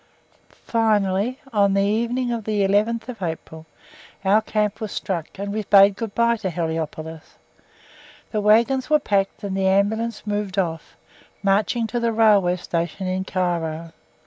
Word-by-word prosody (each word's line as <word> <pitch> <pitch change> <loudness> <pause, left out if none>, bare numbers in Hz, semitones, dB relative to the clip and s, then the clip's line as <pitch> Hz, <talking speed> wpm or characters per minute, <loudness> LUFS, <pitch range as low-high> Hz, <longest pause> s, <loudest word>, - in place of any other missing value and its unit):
Finally, 215 +1 +1
on 200 -2 +3
the 195 - +3
evening 235 +4 0
of 230 -3 -3
the 210 -2 0
11th 220 +3 0
April, 160 -1 -6 0.6
our 205 +3 +4
camp 215 0 -1
was 215 - -4
struck, 170 -5 -3
and; 200 +1 -4
we 215 - -1
bade 200 -1 +6
good 225 -1 -6
bye 235 0 +3
to 210 -4 -3
Heliopolis. 160 -1 -5 1.0
The 215 - -1
waggons 235 +6 +3
were 305 - +5
packed 200 -7 -1
and 195 -1 -3
the 190 0 +1
Ambulance 215 +4 0
moved 205 -2 -3
off, 165 -4 -3 0.5
marching 210 +4 +1
to 235 +2 -2
the 235 0 0
Railway 210 -5 +4
Station 175 +1 -3
in 185 +1 -2
Cairo. 170 -3 -2
200 Hz, 145 wpm, -22 LUFS, 185-225 Hz, 1.0 s, bade